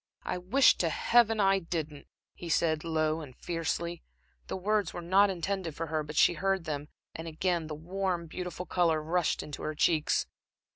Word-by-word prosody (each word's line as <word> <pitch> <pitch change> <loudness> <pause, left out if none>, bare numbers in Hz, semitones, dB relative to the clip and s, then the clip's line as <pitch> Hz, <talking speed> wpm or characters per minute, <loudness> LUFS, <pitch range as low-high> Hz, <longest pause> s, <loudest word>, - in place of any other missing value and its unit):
"I 180 - -3
wish 230 +10 +4
to 170 - +1
Heaven 225 +6 +3
I 195 -1 +4
didn't," 160 -4 -5 0.3
he 170 - -8
said, 155 -1 +1
low 160 -1 0
and 135 -5 -10
fiercely. 170 0 -3 0.5
The - - -3
words 210 +2 0
were 175 - -4
not 195 +4 +4
intended 185 -2 -3
for 165 - -3
her, 155 - +1
but 150 0 -7
she 160 - +5
heard 195 0 0
them 150 -2 -4 0.3
and 160 +1 -7
again 170 0 -1
the 155 - -5
warm, 180 +2 -2
beautiful 180 +2 -6
color 170 -2 +2
rushed 165 +2 0
into 150 - -7
her 155 - -3
cheeks. 155 0 +2
170 Hz, 180 wpm, -30 LUFS, 155-185 Hz, 0.5 s, she